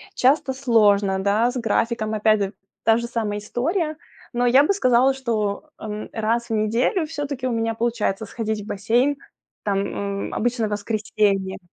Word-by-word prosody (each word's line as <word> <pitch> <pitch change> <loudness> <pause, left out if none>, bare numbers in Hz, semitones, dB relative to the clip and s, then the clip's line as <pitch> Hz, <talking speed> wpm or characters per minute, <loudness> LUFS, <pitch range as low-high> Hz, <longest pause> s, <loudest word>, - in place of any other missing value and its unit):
часто 265 +1 +3
сложно, 210 -7 +3
да, 215 +4 +2
с 255 - -5
графиком 225 -1 0
опять 215 0 +3
д 195 -1 -1 0.3
та 225 +1 +4
же 235 - -3
самая 220 -3 -2
история, 310 - -1 0.4
но 245 0 +1
я 260 +4 +6
бы 400 - +2
сказала, 255 -6 +3
что, 230 -1 -2
м, 215 -1 -5
раз 230 +2 -1
в - - -1
неделю 230 - +1
всё-таки 290 -4 -4
у - - -1
меня 225 -1 0
получается 225 -3 -1
сходить 220 0 -3
в - - -10
бассейн, 240 +8 +1 0.5
там, 200 -2 0 0.5
м, - - -9
обычно 240 0 0
в - - -7
воскресенье. 205 -2 0
230 Hz, 165 wpm, -23 LUFS, 210-255 Hz, 0.5 s, я